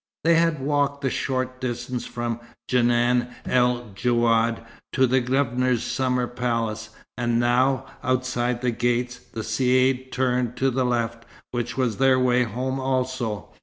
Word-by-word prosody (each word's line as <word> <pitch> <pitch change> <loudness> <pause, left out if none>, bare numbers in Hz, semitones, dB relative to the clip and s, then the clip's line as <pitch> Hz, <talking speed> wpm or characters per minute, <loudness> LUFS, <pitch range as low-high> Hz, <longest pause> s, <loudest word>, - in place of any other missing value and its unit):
They 170 +2 +5
had 165 -2 +3
walked 140 0 0
the 135 - +1
short 130 -1 -2
distance 125 0 -3
from 120 -1 -3 0.3
Djenan 120 0 +2
el 125 -2 +1
Djouad 115 +1 +1 0.3
to 130 0 +4
the 130 +1 +2
Governor's 125 -1 +1
summer 125 -2 0
palace; 115 -3 -2 0.3
and 120 -1 0
now, 125 +2 +2 0.2
outside 125 -2 0
the 125 -1 +1
gates, 120 +1 -1
the 110 - -8
caïd 130 +3 +1
turned 125 -1 0
to 135 +1 +2
the 130 +1 0
left, 115 -1 -1 0.3
which 120 +1 -3
was 125 -5 0
their 130 -1 +4
way 125 -1 +3
home 130 +4 -3
also. 130 -6 -2
125 Hz, 140 wpm, -24 LUFS, 120-130 Hz, 0.3 s, They